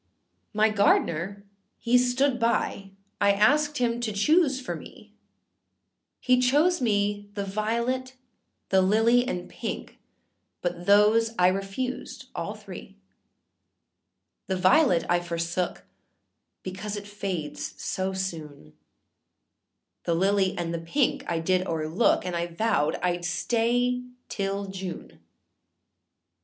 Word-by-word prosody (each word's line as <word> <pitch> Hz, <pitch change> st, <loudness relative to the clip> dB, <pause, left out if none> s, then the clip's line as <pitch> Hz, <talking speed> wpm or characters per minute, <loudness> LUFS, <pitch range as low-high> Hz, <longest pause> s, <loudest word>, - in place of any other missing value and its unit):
My 215 Hz, +1 st, +3 dB
gardener 200 Hz, -1 st, +1 dB, 0.3 s
he 235 Hz, +1 st, +1 dB
stood 250 Hz, +1 st, +1 dB
by, 230 Hz, -4 st, 0 dB, 0.3 s
I 200 Hz, 0 st, +5 dB
asked 295 Hz, +9 st, +3 dB
him 240 Hz, -1 st, 0 dB
to 240 Hz, -2 st, -2 dB
choose 275 Hz, -, +3 dB
for 255 Hz, -, -4 dB
me, -, -, -13 dB, 1.1 s
He 255 Hz, -1 st, +3 dB
chose 295 Hz, +8 st, +3 dB
me 205 Hz, -2 st, 0 dB
the 200 Hz, -1 st, -2 dB
violet, 235 Hz, +6 st, -2 dB, 0.5 s
the 190 Hz, -1 st, +4 dB
lily 225 Hz, +6 st, +3 dB
and 180 Hz, -8 st, -3 dB
pink, -, -, -6 dB, 0.6 s
but 175 Hz, 0 st, -3 dB
those 215 Hz, +3 st, +4 dB
I 180 Hz, 0 st, +5 dB
refused 195 Hz, +7 st, -4 dB
all -, -, -4 dB
three; -, -, -11 dB, 1.5 s
The 190 Hz, -, 0 dB
violet 185 Hz, -, +4 dB
I 175 Hz, 0 st, +3 dB
forsook, 170 Hz, +1 st, -3 dB, 0.8 s
because 200 Hz, +3 st, -5 dB
it 205 Hz, -, -7 dB
fades 190 Hz, -7 st, -5 dB
so 190 Hz, 0 st, -2 dB
soon, 155 Hz, -, -6 dB, 1.3 s
The 170 Hz, -, +1 dB
lily 190 Hz, +1 st, +2 dB
and 170 Hz, -1 st, -2 dB
the 170 Hz, -, -2 dB
pink 245 Hz, -, 0 dB
I 170 Hz, -, 0 dB
did 185 Hz, +3 st, 0 dB
oâerlook, 165 Hz, +6 st, +1 dB
and 180 Hz, -1 st, -3 dB
I 170 Hz, 0 st, -1 dB
vowed 170 Hz, -3 st, 0 dB
Iâd 175 Hz, -1 st, 0 dB
stay 240 Hz, +7 st, +1 dB, 0.3 s
till 200 Hz, 0 st, -2 dB
June. 190 Hz, -2 st, -7 dB
200 Hz, 115 wpm, -26 LUFS, 180-235 Hz, 1.5 s, I